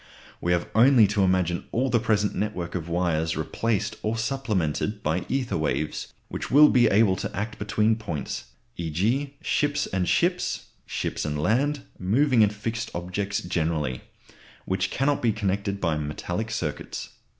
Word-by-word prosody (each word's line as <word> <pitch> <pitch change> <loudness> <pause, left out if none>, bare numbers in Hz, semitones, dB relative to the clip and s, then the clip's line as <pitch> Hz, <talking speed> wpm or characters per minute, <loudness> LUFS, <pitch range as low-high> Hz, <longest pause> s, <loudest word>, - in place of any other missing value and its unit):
We 90 - 0
have 85 0 0
only 120 0 +7
to 105 0 +1
imagine 90 -2 +1
all 130 +2 0
the 120 - +4
present 105 -2 +1
network 90 -5 -3
of 85 -2 -4
wires 85 -2 0
replaced 105 +6 -1
or 110 +2 -1
supplemented 105 - -1
by 80 +4 -1
ether 130 -2 -1
waves, 75 0 -2 0.2
which - - -5
will 150 +2 +8
be 120 -2 +5
able 105 -2 +4
to - - -4
act 110 +2 -3
between 105 +1 +2
points 95 -10 -4 0.3
(e.g. 110 - -1
ships 145 -1 +1
and 90 -1 -1
ships, 180 +1 0 0.2
ships - - -2
and 75 -1 -2
land, 135 - +1 0.2
moving 120 +6 +3
and 105 -1 +5
fixed 115 +3 -4
objects 95 +3 -2
generally) 80 -7 -1 0.6
which 95 - 0
cannot 140 +2 +1
be 115 - +3
connected 100 -1 -1
by 85 -4 +1
metallic 85 +8 -3
circuits. 85 -10 -4
105 Hz, 150 wpm, -26 LUFS, 85-115 Hz, 0.6 s, will